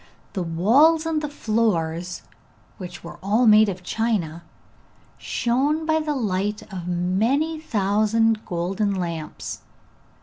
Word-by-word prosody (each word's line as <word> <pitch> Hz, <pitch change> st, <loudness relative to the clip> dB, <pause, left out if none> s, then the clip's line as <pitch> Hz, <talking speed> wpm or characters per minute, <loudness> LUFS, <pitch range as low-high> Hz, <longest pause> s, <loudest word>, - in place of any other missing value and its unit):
The 190 Hz, -, -2 dB
walls 245 Hz, -, +4 dB
and 320 Hz, -2 st, 0 dB
the 300 Hz, -, -3 dB
floors, 180 Hz, -, -1 dB, 0.6 s
which 180 Hz, -2 st, -8 dB
were 170 Hz, -, -10 dB
all 210 Hz, +5 st, +2 dB, 0.3 s
of 180 Hz, -1 st, -6 dB
china, 180 Hz, -6 st, -1 dB, 0.8 s
shone 280 Hz, +7 st, 0 dB
by 315 Hz, 0 st, +2 dB
the 305 Hz, -1 st, -2 dB
light 210 Hz, -3 st, -1 dB
of 180 Hz, -2 st, -6 dB
many 220 Hz, -, 0 dB
thousand 220 Hz, -2 st, +1 dB
golden 195 Hz, +3 st, -1 dB
lamps. 170 Hz, -4 st, -5 dB
210 Hz, 110 wpm, -23 LUFS, 180-260 Hz, 0.8 s, walls